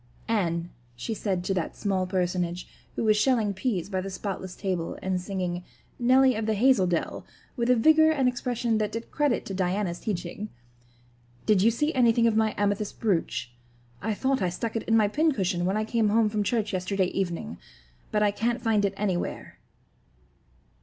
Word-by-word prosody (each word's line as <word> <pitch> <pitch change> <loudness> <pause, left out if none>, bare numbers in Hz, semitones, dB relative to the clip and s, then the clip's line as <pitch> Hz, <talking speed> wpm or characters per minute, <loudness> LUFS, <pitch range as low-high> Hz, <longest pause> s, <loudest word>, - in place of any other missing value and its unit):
"Anne," 175 -6 0 0.2
she 125 - -4
said 190 -4 -2
to 195 - -1
that 180 -3 -2
small 190 -3 -1
personage, 180 -1 -1 0.3
who - - -1
was 215 -1 +4
shelling 215 -2 +2
peas 190 -3 -2
by 190 -2 -2
the 195 - -5
spotless 190 -1 -5
table 185 -4 -3
and 185 -1 -1
singing, 180 -2 -3 0.4
"Nelly 260 +2 +5
of 220 -1 -3
the 220 - +1
Hazel 235 -3 +4
Dell" 175 -2 -2 0.3
with 235 -1 -1
a 250 - +6
vigor 315 +6 +5
and 275 -5 +2
expression 245 -2 0
that 210 -1 -1
did 230 +1 -6
credit 290 -5 +1
to 195 - -5
Diana's 185 -1 -1
teaching, 200 0 -4 1.0
"did 210 -3 +4
you 220 - +5
see 295 +7 0
anything 235 -2 +4
of 230 -2 +3
my 220 -1 +2
amethyst 205 0 -1
brooch? 170 - -1 0.5
I 220 0 -1
thought 265 +1 0
I 185 - +1
stuck 220 +6 -4
it 225 - 0
in 225 - +5
my 215 -2 +4
pincushion 200 - +1
when 190 +3 +1
I 215 - 0
came 220 -1 +1
home 220 0 +3
from 210 0 -1
church 215 0 0
yesterday 185 +1 0
evening, 175 - -3 0.5
but 210 0 +2
I 205 - +3
can't 235 +4 -1
find 225 -3 +1
it 195 0 -1
anywhere." 190 -4 -3
210 Hz, 180 wpm, -27 LUFS, 185-230 Hz, 1.0 s, a